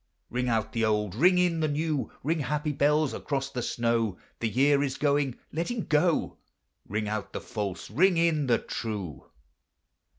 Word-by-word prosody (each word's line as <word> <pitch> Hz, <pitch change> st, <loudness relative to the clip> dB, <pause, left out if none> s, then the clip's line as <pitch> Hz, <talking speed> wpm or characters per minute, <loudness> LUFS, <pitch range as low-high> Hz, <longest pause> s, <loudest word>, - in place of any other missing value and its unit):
Ring 125 Hz, 0 st, 0 dB
out 110 Hz, -1 st, 0 dB
the 115 Hz, -, 0 dB
old, 105 Hz, -3 st, +1 dB
ring 180 Hz, -, +4 dB
in 175 Hz, -2 st, +2 dB
the 155 Hz, -, +1 dB
new 150 Hz, -1 st, -1 dB
— -, -, -34 dB
Ring, 160 Hz, +4 st, 0 dB
happy 150 Hz, +2 st, -1 dB
bells, 150 Hz, +1 st, +2 dB
across 140 Hz, -1 st, -3 dB
the 125 Hz, -3 st, -3 dB
snow: 115 Hz, -4 st, 0 dB, 0.2 s
The 115 Hz, -, 0 dB
year 140 Hz, +4 st, +3 dB
is 135 Hz, -2 st, -1 dB
going, 140 Hz, -3 st, +1 dB, 0.2 s
let 165 Hz, +3 st, -1 dB
him 240 Hz, -4 st, -3 dB
go; 155 Hz, +2 st, +1 dB, 0.5 s
Ring 105 Hz, +1 st, -2 dB
out 105 Hz, -1 st, -4 dB
the -, -, -3 dB
false, 100 Hz, -4 st, -5 dB
ring 185 Hz, +2 st, +4 dB
in 165 Hz, -4 st, +2 dB
the 120 Hz, -2 st, +4 dB
true. 100 Hz, -, -5 dB
140 Hz, 175 wpm, -28 LUFS, 115-155 Hz, 0.5 s, ring